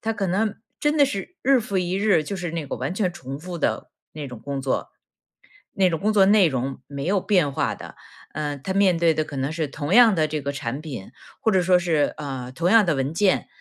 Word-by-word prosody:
他 225 0 0
可 200 -3 -2
能 200 +4 0 0.2
真 295 0 +1
的 290 -2 +5
是 265 - -5
日 270 0 +4
复 200 -4 -2
一 180 0 -1
日， 195 -5 +3
就 195 +6 -5
是 175 -2 -4
那 165 -2 -4
个 - - -4
完 135 +7 -3
全 190 -3 0
重 135 -5 -8
复 180 +2 -6
的 165 - -2 0.2
那 150 -2 -6
种 125 -2 -9
工 140 +3 -4
作。 130 -1 -2 0.9
那 190 -2 +3
种 165 -2 -2
工 215 +2 +2
作 200 -2 +5
内 200 -2 +5
容 130 0 -3
没 140 -1 -6
有 190 +2 +1
变 175 -10 +2
化 - - -1
的， - - -11 0.4
呃， 145 -1 -3
他 190 +8 -4
面 190 -3 +3
对 165 -1 +3
的 155 0 0
可 145 -2 -8
能 135 +3 -2
是 155 -2 -2
同 145 +4 -3
样 235 -1 +7
的 155 -2 +2
这 155 0 -3
个 140 +1 -3
产 135 0 -4
品， 130 -11 -8 0.3
或 225 - +1
者 190 -3 +3
说 180 0 +4
是， 165 -4 +1
呃， 135 -4 -5
同 170 +7 0
样 225 -3 +6
的 170 - +2
文 135 +1 -2
件， 190 +2 +2
170 Hz, 260 characters per minute, -23 LUFS, 145-195 Hz, 0.9 s, 样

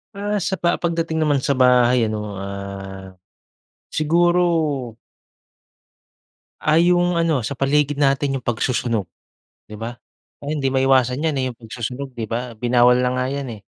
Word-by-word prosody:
Ah, 205 0 -2
sa 190 +1 -1
pa 170 +1 +1
pagdating 165 -2 -1
naman 150 -2 +2
sa 140 +1 0
bahay 125 -2 +4
ano, 105 -1 -4
ah, 100 -1 -7 0.8
siguro 165 -5 +1 1.7
ah 155 - +2
yung 175 +1 +3
ano, 165 -4 +2
sa 125 +4 -4
paligid 145 +2 +1
natin 140 -1 +1
yung 130 - -5
pagsusunog, 115 -3 -1 0.6
di 105 - -8
ba? 115 +2 -5 0.5
Ah, 145 - -4
hindi 150 -3 -1
maiwasan 130 0 +2
yan, 155 -3 0
eh, 130 - 0
yung - - -10
pagsusunog, 125 +4 -6
di 115 -3 -5
ba? 115 +1 -5
Binawal 125 +1 +4
na 125 0 +1
nga 125 0 0
'yan, 140 0 -3
eh. 105 - -14
130 Hz, 150 wpm, -21 LUFS, 120-155 Hz, 1.7 s, bahay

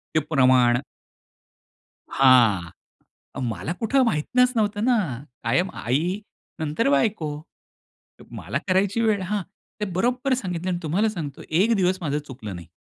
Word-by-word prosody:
ते - - +5
प्रमाण. 125 -4 +4 1.3
हां. 115 -10 +4 0.8
मला 110 - -4
कुठं 260 +4 +2
माहीतनच 245 +7 +2
नव्हतं 210 -2 0
ना 250 -1 +4 0.5
कायम 175 +11 +1
आई 160 - -1 0.4
नंतर 150 -2 0
बायको. 150 0 0 0.9
मला - - -4
करायची 195 +4 +2
वेळ 215 -3 +2
हां. 200 +2 -2 0.4
ते 210 - -1
बरोबर 250 +8 0
सांगितलं 185 -7 -3
आणि 175 -1 -1
तुम्हाला 185 +8 +1
सांगतो 160 -9 -6
एक 195 +9 +3
दिवस 185 -2 +1
माझं 150 -3 -1
चुकलं 130 -9 -8
नाही. 85 -1 -10
175 Hz, 125 wpm, -24 LUFS, 135-210 Hz, 1.3 s, ते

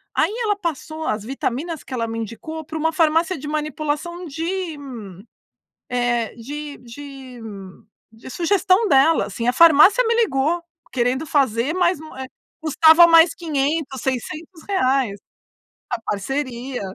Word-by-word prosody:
aí 320 +5 +2
ela 420 -2 +1
passou 320 -3 -5
as 215 -6 -2
vitaminas 275 +6 -4
que - - -10
ela 230 -2 -1
me 225 0 -4
indicou 315 +9 -6
pra 315 +1 -6
uma 320 +1 +1
farmácia 325 +3 +2
de 295 +1 -8
manipulação 305 +3 -3
de 330 +2 -4
hum, 275 -4 -8 0.9
eh, 240 -2 0
de 290 +5 -7
de 260 0 -11
hum 195 -4 -10 0.3
de 225 +3 -15
sugestão 375 - +2
dela 300 +1 +4
assim, 230 +4 -4
a 245 - +3
farmácia 335 - +7
me 460 - +2
ligou 340 - +1 0.3
querendo 255 +4 0
fazer, 265 -1 +1
mas, 360 -2 +2
eh, 265 -4 -8 0.3
custava 320 +1 +6
mais 330 -1 +6
R$500, 290 -4 -2
R$600 270 - -1 0.7
a 240 -2 -3
parceria. 250 +4 -3
295 Hz, 135 wpm, -21 LUFS, 250-330 Hz, 0.9 s, farmácia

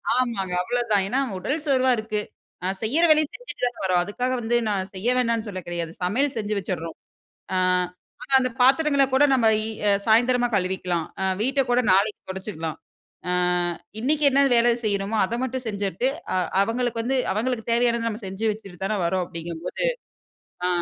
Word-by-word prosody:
ஆமாங்க. 220 -8 -1
அவ்ளோதான். 230 -3 +1
ஏனா 255 +6 0 0.2
உடல் 290 - -2
சோர்வா 260 -2 +3
இருக்கு 215 -1 -2 0.4
நான் 190 +1 -2
செய்யுற 305 +10 +3
வேலைய 310 0 +5
செஞ்சிட்டுதானவரோம். 230 - -1
அதுக்காகவந்து 240 +2 -1
நான் 190 -2 -1
செய்யவேணான்னு 230 +2 0
சொல்ல 185 -2 -5
கெடயாது, 170 -1 -4
சமயல் 260 +9 0
செஞ்சி 210 -1 -2
வச்சிற்ரோம் 165 -3 -5 0.6
அ - - +1 0.7
ஆனா, 275 -3 0
அந்த 255 -1 0
பத்தரங்கள 280 +2 +4
கூட 275 +2 +5
நம்ம 240 -4 +3 0.2
இ - - -3 0.4
சயந்தரமா 245 +2 +4
கழுவிக்கலாம் 180 -3 -1 0.2
அ - - +1 0.2
வீட்ட 270 +4 +1
கூட 245 +1 +4
நாளைக்கி 200 +2 +2
தொடச்சுக்கலாம். 185 -5 -5 0.5
ஆ - - +1 0.7
இன்னிக்கி 295 +4 +1
என்ன 275 +1 +4
வேலை 235 0 +5
செய்யணுமோ! 200 +1 -1
அத 230 - -3
மட்டும் 260 0 -3
செஞ்சுட்டு, 200 +4 -1 0.3
அ - - +1 0.3
அவுங்களுக்கு 230 +1 -1
வந்து 260 +2 0
அவுங்குளுக்கு 230 +2 -2
தேவையானத 235 -1 +2
நம்ம 220 +1 -5
செஞ்சு 195 +4 -3
வச்சிட்டு 195 -5 -11
தான 210 +1 -1
வர்றோம் 185 +2 +1
அப்பிடிங்கம்போது, 170 - -4 0.8
ஆ, - - +2
225 Hz, 150 wpm, -24 LUFS, 190-255 Hz, 0.8 s, வேலைய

